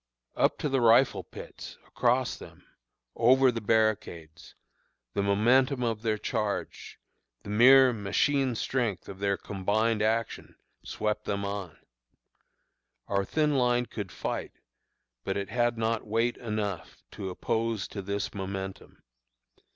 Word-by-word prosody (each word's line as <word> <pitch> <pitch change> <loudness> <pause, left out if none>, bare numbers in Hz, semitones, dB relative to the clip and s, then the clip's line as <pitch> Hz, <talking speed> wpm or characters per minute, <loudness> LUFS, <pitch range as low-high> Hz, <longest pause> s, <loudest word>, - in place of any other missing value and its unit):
"Up - - +2
to - - -2
the 135 -2 +1
rifle 120 +3 +4
pits, - - -10
across 125 +1 +1
them, - - -14 0.5
over 130 +2 +5
the 115 -1 -4
barricades 100 -7 -1 0.6
the - - 0
momentum 125 +7 +3
of 115 -2 -1
their 110 -2 0
charge, 105 -2 -4 0.4
the 100 - -7
mere 130 +3 +7
machine 125 +5 +1
strength 115 -4 -2
of 95 - -9
their 100 -1 0
combined 105 +3 -1
action, 110 +1 -1 0.3
swept 105 0 -3
them 100 0 -2
on. 100 -5 -5 1.3
Our 100 -1 0
thin 150 +8 0
line 125 -1 +2
could 100 -6 -7
fight, - - -4 0.7
but 95 - -2
it 100 -1 -4
had 120 -1 0
not 115 0 -1
weight 115 +3 +1
enough 105 -5 -4
to 100 -3 -6
oppose 110 +3 -2
to 100 - -6
this 100 +1 -3
momentum. 95 -1 -6
110 Hz, 130 wpm, -28 LUFS, 100-120 Hz, 1.3 s, mere